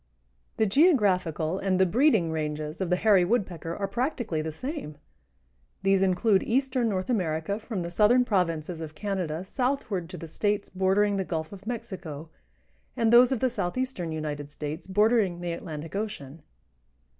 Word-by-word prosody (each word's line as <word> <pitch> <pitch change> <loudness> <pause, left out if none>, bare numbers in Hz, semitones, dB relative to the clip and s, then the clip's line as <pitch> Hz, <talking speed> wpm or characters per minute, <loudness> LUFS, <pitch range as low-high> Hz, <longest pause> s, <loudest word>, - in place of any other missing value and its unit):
The 220 - +3
geographical 190 - +2
and 190 -1 0
the 190 - +6
breeding 215 - +3
ranges 150 +1 -3
of 185 - -1
the 180 - +3
Hairy 195 -1 +4
Woodpecker 175 -5 -1
are 200 - -2
practically 235 - -2
the 160 0 -4
same. 255 - -6 0.9
These 195 0 +3
include 195 +2 +3
eastern 255 -1 +1
North 185 -3 -2
America 185 -3 -1
from 215 -5 -4
the 170 - -5
southern 230 +7 +4
provinces 170 -5 -1
of 155 -1 -7
Canada 185 -3 -3
southward 240 -7 -2
to 180 - -7
the 165 - -7
States 205 +5 -1
bordering 195 +2 +2
the 190 - 0
Gulf 160 -1 -4
of 200 +1 -12
Mexico 180 -10 -6 0.7
and 225 0 +2
those 245 +1 +7
of 260 - -1
the 260 - +3
southeastern 230 -4 -2
United 150 -2 -4
States 150 +3 -6
bordering 205 -2 +2
the 175 -1 -3
Atlantic 165 -1 -6
Ocean. 165 -9 -5
190 Hz, 155 wpm, -27 LUFS, 165-220 Hz, 0.9 s, those